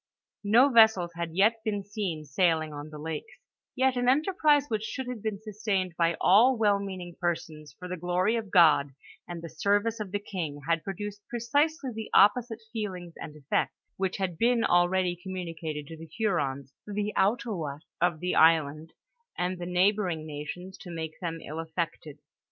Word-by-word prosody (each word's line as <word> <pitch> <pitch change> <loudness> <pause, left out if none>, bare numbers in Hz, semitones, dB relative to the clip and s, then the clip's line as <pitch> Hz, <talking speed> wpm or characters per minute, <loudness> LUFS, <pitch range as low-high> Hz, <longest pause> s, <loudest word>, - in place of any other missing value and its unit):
No 235 +7 +5
vessels 220 -8 +5
had 165 -1 -5
yet 220 +4 +3
been 205 -2 -2
seen 190 -6 -4
sailing 160 +1 +1
on 145 +1 -7
the 155 - -9
lakes; 160 - -6 0.4
yet 260 0 +2
an 245 0 +2
enterprise 300 0 +3
which 220 -4 -1
should 260 +4 -4
have 250 -4 -5
been 215 -2 -3
sustained 205 -4 -2
by 170 -1 +1
all 235 +7 +5
well 205 -2 +3
meaning 185 -3 -6
persons, 160 -3 -3
for 180 - -8
the 180 0 -4
gloiy 180 +5 +1
of 225 -3 -3
God, 155 -6 +5 0.3
and 175 -1 -7
the - - -5
service 205 +6 0
of 210 -2 -4
the 205 - 0
king, 170 -8 -5
had 165 -1 +1
produced 205 +2 -6
precisely 285 +5 0
the 220 0 -6
opposite 225 +2 +4
feelings 185 -6 -5
and 150 - -8
effects, 140 -2 -1 0.2
which 190 -1 -2
had 185 -4 -3
been 235 0 +3
already 175 0 +2
communicated 165 -4 -5
to 160 - -9
the 165 +1 -10
Hurons, 140 - -1
the 210 0 -2
Outaoiiats 190 - 0 0.2
of 175 -2 +2
the 180 0 -1
island 160 -1 +3 0.4
and 180 0 -2
the 175 - -5
neighboring 180 -3 +1
nations, 155 +5 -7
to 180 - -10
make 160 -2 -6
them 165 -2 -4
ill 155 +2 -6
affected. 160 -2 -4
185 Hz, 170 wpm, -28 LUFS, 165-215 Hz, 0.4 s, No